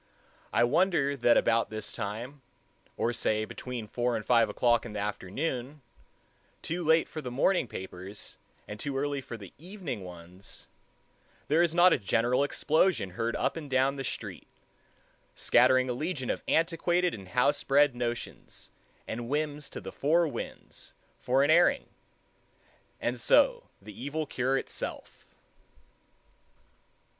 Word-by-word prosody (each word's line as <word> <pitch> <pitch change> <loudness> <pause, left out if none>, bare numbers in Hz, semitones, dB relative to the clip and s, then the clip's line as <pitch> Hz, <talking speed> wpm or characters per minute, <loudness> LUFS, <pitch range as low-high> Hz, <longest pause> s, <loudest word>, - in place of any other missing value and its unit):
I - - +3
wonder 140 +1 +2
that 120 -2 +4
about 115 0 +2
this 110 -1 -3
time, 115 +6 -5 0.6
or 120 - 0
say 110 -2 0
between 125 0 -6
four 120 +2 -1
and 105 - -4
five 115 -2 +4
o'clock 120 -2 +2
in 120 - -8
the 105 - -3
afternoon, 125 - -3 0.8
too 175 +2 -3
late 160 +1 +4
for 155 - -6
the 125 - -5
morning 140 +5 +2
papers 95 0 -8 0.3
and 105 0 -7
too 140 +2 -3
early 140 0 -1
for 120 -3 -8
the 100 -5 -12
evening 170 - -6
ones, 90 +2 -8 0.8
there 155 +4 +4
is 170 -1 +2
not 175 0 +7
a - - +1
general 120 +6 +2
explosion 150 - +1
heard 115 +5 -2
up - - 0
and 155 -4 -7
down 130 +1 +2
the 135 - -4
street, - - -6 0.9
scattering 130 +1 +4
a 125 - -1
legion 135 -1 -2
of - - -4
antiquated 175 +2 +2
and 95 -3 -8
house 125 +7 +2
bred 140 0 +4
notions 120 -1 -5 0.4
and 120 +1 -5
whims 150 0 -2
to - - -7
the - - -8
four 165 +4 +2
winds 145 - -8 0.3
for 130 +2 +2
an 145 - +3
airing—and 175 - -2
so - - +4
the - - -11
evil 155 +3 -2
cure 135 -1 0
itself. - - -6
130 Hz, 140 wpm, -29 LUFS, 115-155 Hz, 0.9 s, not